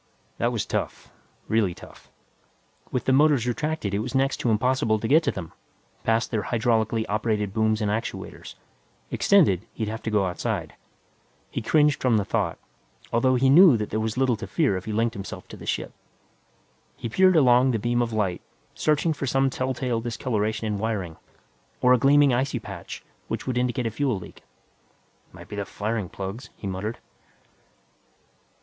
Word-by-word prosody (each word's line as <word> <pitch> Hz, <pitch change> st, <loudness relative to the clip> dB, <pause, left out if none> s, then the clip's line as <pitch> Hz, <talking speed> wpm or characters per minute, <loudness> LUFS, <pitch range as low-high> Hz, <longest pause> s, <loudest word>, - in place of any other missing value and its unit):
That -, -, +1 dB
was -, -, -2 dB
tough, -, -, -4 dB, 0.4 s
really 105 Hz, -6 st, +1 dB
tough. -, -, -15 dB, 0.8 s
With 125 Hz, -, -2 dB
the 130 Hz, -, +3 dB
motors 145 Hz, -3 st, +4 dB
retracted 135 Hz, -3 st, -2 dB
it 100 Hz, -, +1 dB
was 125 Hz, +5 st, -4 dB
next 135 Hz, +1 st, +2 dB
to 120 Hz, -, -1 dB
impossible 115 Hz, 0 st, +2 dB
to 110 Hz, -, -3 dB
get 155 Hz, +6 st, +5 dB
to 140 Hz, -, +2 dB
them, 85 Hz, -4 st, -7 dB, 0.5 s
past 115 Hz, +1 st, +1 dB
their 110 Hz, -3 st, 0 dB
hydraulically 110 Hz, -1 st, +1 dB
operated 105 Hz, -1 st, -1 dB
booms 110 Hz, 0 st, +1 dB
and 105 Hz, -1 st, 0 dB
actuators. 110 Hz, +2 st, -5 dB, 0.6 s
Extended, 150 Hz, -, +4 dB
he'd 110 Hz, -1 st, -2 dB
have 110 Hz, +1 st, -5 dB
to -, -, -3 dB
go 105 Hz, -3 st, +2 dB
outside. 90 Hz, -1 st, -3 dB, 0.8 s
He -, -, -3 dB
cringed 150 Hz, +4 st, +3 dB
from 125 Hz, -4 st, +3 dB
the 100 Hz, -, 0 dB
thought, -, -, -1 dB, 0.6 s
although 130 Hz, +2 st, +3 dB
he 130 Hz, +2 st, +3 dB
knew 155 Hz, -1 st, +8 dB
that 105 Hz, -1 st, -4 dB
there 110 Hz, -, 0 dB
was 110 Hz, +1 st, -2 dB
little 130 Hz, -2 st, +2 dB
to 115 Hz, -, -7 dB
fear 150 Hz, -, +1 dB
if 95 Hz, -, -5 dB
he 110 Hz, -, -4 dB
linked 115 Hz, +2 st, 0 dB
himself 100 Hz, -4 st, -8 dB
to -, -, -9 dB
the -, -, -11 dB
ship. -, -, -2 dB, 1.0 s
He -, -, -4 dB
peered 185 Hz, +10 st, +4 dB
along 130 Hz, -3 st, +5 dB
the 120 Hz, -, +1 dB
beam 120 Hz, +2 st, 0 dB
of 120 Hz, -1 st, -1 dB
light, 105 Hz, -5 st, -1 dB, 0.3 s
searching 155 Hz, +2 st, +1 dB
for 140 Hz, -2 st, -4 dB
some 135 Hz, +1 st, +2 dB
telltale 130 Hz, -2 st, -2 dB
discoloration 115 Hz, -2 st, -2 dB
in 105 Hz, -2 st, -2 dB
wiring, 100 Hz, -7 st, -3 dB, 0.6 s
or 125 Hz, 0 st, +5 dB
a 125 Hz, -, +4 dB
gleaming 140 Hz, +1 st, +5 dB
icy 130 Hz, +3 st, 0 dB
patch -, -, -8 dB, 0.2 s
which -, -, -4 dB
would 130 Hz, -, -2 dB
indicate 125 Hz, 0 st, 0 dB
a 115 Hz, -, -1 dB
fuel 130 Hz, -1 st, 0 dB
leak. 90 Hz, -, -11 dB, 0.9 s
"Might -, -, -13 dB
be 105 Hz, -, -8 dB
the 100 Hz, -, -1 dB
firing 105 Hz, -2 st, -3 dB
plugs," 100 Hz, +6 st, -6 dB
he -, -, -9 dB
muttered. 100 Hz, +4 st, -3 dB
115 Hz, 175 wpm, -25 LUFS, 105-130 Hz, 1.0 s, knew